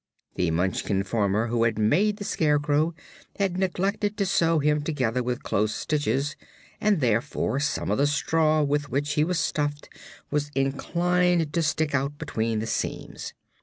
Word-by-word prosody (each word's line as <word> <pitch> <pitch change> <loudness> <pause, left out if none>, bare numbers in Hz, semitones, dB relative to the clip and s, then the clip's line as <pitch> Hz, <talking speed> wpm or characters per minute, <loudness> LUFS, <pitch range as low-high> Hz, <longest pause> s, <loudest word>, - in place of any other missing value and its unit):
The 90 - 0
Munchkin 95 +3 0
farmer 105 +1 +1
who 115 0 0
had 115 -2 +1
made 195 - +2
the 205 - -6
Scarecrow 150 -1 +1 0.4
had 190 -2 0
neglected 200 +3 -1
to 200 - +1
sew 165 -3 +2
him 150 0 +2
together 130 -6 -1
with 125 0 -3
close 105 +2 0
stitches 145 -1 -1 0.5
and 205 -6 +2
therefore 120 +3 0
some 145 +1 -1
of - - +1
the 145 - +4
straw 155 +1 +2
with 145 0 0
which 145 +3 -1
he 150 - +3
was 180 +2 0
stuffed 145 -2 -1 0.4
was 145 0 0
inclined 170 +4 +1
to 170 - +1
stick 155 -1 0
out 140 +2 -1
between 115 -8 -2
the 110 - -2
seams. - - -4
145 Hz, 160 wpm, -26 LUFS, 120-165 Hz, 0.5 s, the